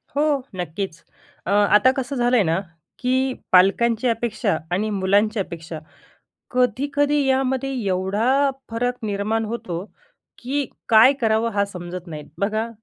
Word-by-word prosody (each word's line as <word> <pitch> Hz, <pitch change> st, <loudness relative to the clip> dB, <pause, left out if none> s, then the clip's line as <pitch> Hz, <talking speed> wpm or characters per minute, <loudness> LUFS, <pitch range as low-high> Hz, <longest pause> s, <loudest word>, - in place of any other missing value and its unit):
हो, 290 Hz, -, +2 dB, 0.3 s
नक्कीच. 175 Hz, 0 st, -5 dB, 0.5 s
अ, -, -, 0 dB
आता 205 Hz, +3 st, +5 dB
कसं 265 Hz, +1 st, -3 dB
झालंय 245 Hz, -2 st, +3 dB
ना, 165 Hz, 0 st, +1 dB, 0.4 s
की 260 Hz, +1 st, +1 dB, 0.2 s
पालकांची 220 Hz, +6 st, +4 dB
अपेक्षा 230 Hz, -7 st, 0 dB
आणि 205 Hz, +5 st, 0 dB
मुलांची 205 Hz, +3 st, +2 dB
अपेक्षा 165 Hz, -3 st, -6 dB, 0.7 s
कधी-कधी 285 Hz, +4 st, +1 dB
यामध्ये 265 Hz, 0 st, 0 dB, 0.2 s
एवढा 190 Hz, +6 st, 0 dB, 0.4 s
फरक 245 Hz, +2 st, -1 dB
निर्माण 210 Hz, +2 st, -1 dB
होतो 210 Hz, -6 st, -4 dB, 0.5 s
की 280 Hz, +3 st, -2 dB, 0.2 s
काय 230 Hz, +3 st, +7 dB
करावं 225 Hz, 0 st, +1 dB
हा 200 Hz, 0 st, +2 dB
समजत 180 Hz, -2 st, -8 dB
नाहीत. 155 Hz, -3 st, -8 dB
बघा, 215 Hz, +3 st, -1 dB
220 Hz, 120 wpm, -22 LUFS, 190-250 Hz, 0.7 s, काय